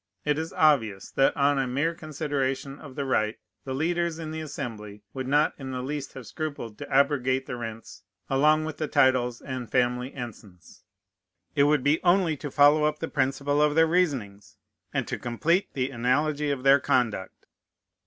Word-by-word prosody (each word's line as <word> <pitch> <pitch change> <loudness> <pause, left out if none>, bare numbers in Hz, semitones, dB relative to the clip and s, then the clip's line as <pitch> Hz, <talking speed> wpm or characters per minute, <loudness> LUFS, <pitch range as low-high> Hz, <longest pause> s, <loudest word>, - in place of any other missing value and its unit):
It 150 +1 +1
is 160 +1 -4
obvious, 115 -11 +2
that, 135 - +2
on 140 0 +3
a 135 - 0
mere 140 +7 0
consideration 145 -3 -3
of 140 -4 -11
the 140 - -2
right, 110 -4 0 0.3
the 130 -1 -3
leaders 170 +2 0
in 160 -2 -6
the 160 0 -4
Assembly 105 -8 -7
would 130 -1 -4
not 145 +3 +3
in 135 -1 -6
the 130 -1 -4
least 145 +1 -5
have 130 -3 -9
scrupled 140 -7 -6
to - - -7
abrogate 135 -1 +2
the - - -5
rents 115 -4 -8 0.3
along 150 +3 +3
with 155 -2 -5
the 155 - -2
titles 125 -3 +2
and 130 -4 -6
family 125 +1 +1
ensigns. 105 - -10 0.7
It 140 - +4
would 145 -2 +2
be 150 +2 +2
only 175 -3 +3
to 145 - -6
follow 145 +2 +5
up 150 0 0
the 165 - -4
principle 140 +1 0
of 150 0 +3
their 165 0 +6
reasonings, 135 - -1 0.3
and - - -2
to - - -4
complete 165 - 0
the 130 0 -1
analogy 145 +5 0
of 135 -3 -2
their 135 +1 +6
conduct. 115 -8 -1
140 Hz, 180 wpm, -26 LUFS, 125-150 Hz, 0.7 s, their